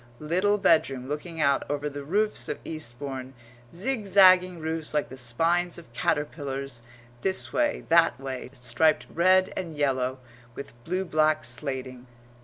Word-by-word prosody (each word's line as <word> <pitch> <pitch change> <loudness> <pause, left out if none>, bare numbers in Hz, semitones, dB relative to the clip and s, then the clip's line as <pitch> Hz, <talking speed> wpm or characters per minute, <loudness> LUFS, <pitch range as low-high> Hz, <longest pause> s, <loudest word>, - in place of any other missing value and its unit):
little 185 +8 +1
bedroom 135 -9 +2
looking 160 +3 -5
out 140 -2 +3
over 145 0 -2
the 145 -1 -6
roofs 210 +8 -1
of - - -2
Eastbourne 135 -2 -6 0.4
zigzagging 185 -4 +4
roofs 160 -1 -3
like 150 - 0
the 130 - -9
spines 165 +8 0
of 160 -9 -14
caterpillars, 140 -3 -2 0.4
this 190 -1 0
way, 300 -1 0
that 165 -6 +4
way, 130 -2 -6
striped 130 +4 +1
red 185 +2 +4
and 170 -4 -5
yellow, 130 -3 0 0.4
with 140 - -8
blue 185 +2 -1
black 155 -2 +2
slating]. 130 0 -5
150 Hz, 135 wpm, -26 LUFS, 135-175 Hz, 0.4 s, zigzagging